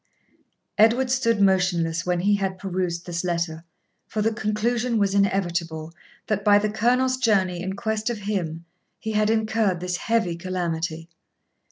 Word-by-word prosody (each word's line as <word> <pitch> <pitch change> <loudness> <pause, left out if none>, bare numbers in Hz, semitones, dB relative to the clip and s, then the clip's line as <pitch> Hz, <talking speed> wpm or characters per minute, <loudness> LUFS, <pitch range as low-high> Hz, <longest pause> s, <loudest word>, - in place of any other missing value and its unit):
Edward 240 +4 +4
stood 230 -4 +2
motionless 180 -4 +2
when 175 -1 +1
he 205 +3 +3
had 190 -1 -2
perused 180 -2 -3
this 170 -1 -3
letter; 170 -2 -2 0.4
for 215 0 -2
the 225 +1 +1
conclusion 230 +2 0
was 200 -2 +1
inevitable, 170 -5 0 0.3
that, 205 -2 -1
by 205 0 +6
the 210 0 0
Colonel's 250 +4 +2
journey 190 -7 +1
in 190 +1 -3
quest 220 +1 -2
of 240 - -2
him, 170 -5 -3 0.3
he 220 - -4
had 215 0 +2
incurred 220 -4 +1
this 180 0 -2
heavy 225 -7 0
calamity. 170 -2 -3
195 Hz, 150 wpm, -24 LUFS, 175-220 Hz, 0.4 s, by